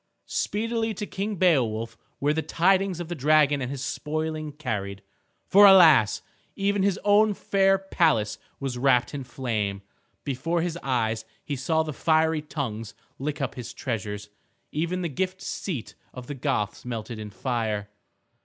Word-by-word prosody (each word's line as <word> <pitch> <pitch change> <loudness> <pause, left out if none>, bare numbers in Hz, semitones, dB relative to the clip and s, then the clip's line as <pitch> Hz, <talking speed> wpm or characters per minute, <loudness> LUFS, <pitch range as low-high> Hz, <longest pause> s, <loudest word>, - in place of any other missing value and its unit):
Speedily 225 +1 -1
to 210 - -4
King 205 +1 -3
Beowulf 115 - +2 0.2
were 145 +2 +2
the 160 - 0
tidings 190 +2 +2
of 175 - -4
the 175 - -4
dragon 150 -1 +3
and 125 - -2
his 135 -1 -5
spoiling 155 +1 -3
carried. 105 -9 -4 0.4
For 205 +1 +8
alas! 160 - +7 0.3
even 200 0 +1
his 195 0 +1
own 210 0 +4
fair 195 0 +3
palace 160 - +1 0.2
was 130 -3 -3
wrapped 125 -1 +3
in 140 -2 -4
flame. 110 -6 -3 0.4
Before 165 +5 -1
his 175 -2 -2
eyes 115 -4 0 0.2
he 145 - -2
saw 160 +5 +1
the 155 -1 -5
fiery 160 +1 +2
tongues 115 -9 -5 0.2
lick 150 +2 -3
up 135 - -2
his 125 -3 -8
treasures. 105 -3 -4 0.4
Even 170 +4 -1
the - - 0
Gift 185 +5 -2
seat 155 - -5 0.2
of 125 -1 -7
the 145 - -5
Goths 130 -7 -2
melted 115 -2 -5
in 105 -1 -6
fire. 110 -3 -2
145 Hz, 155 wpm, -26 LUFS, 120-175 Hz, 0.4 s, For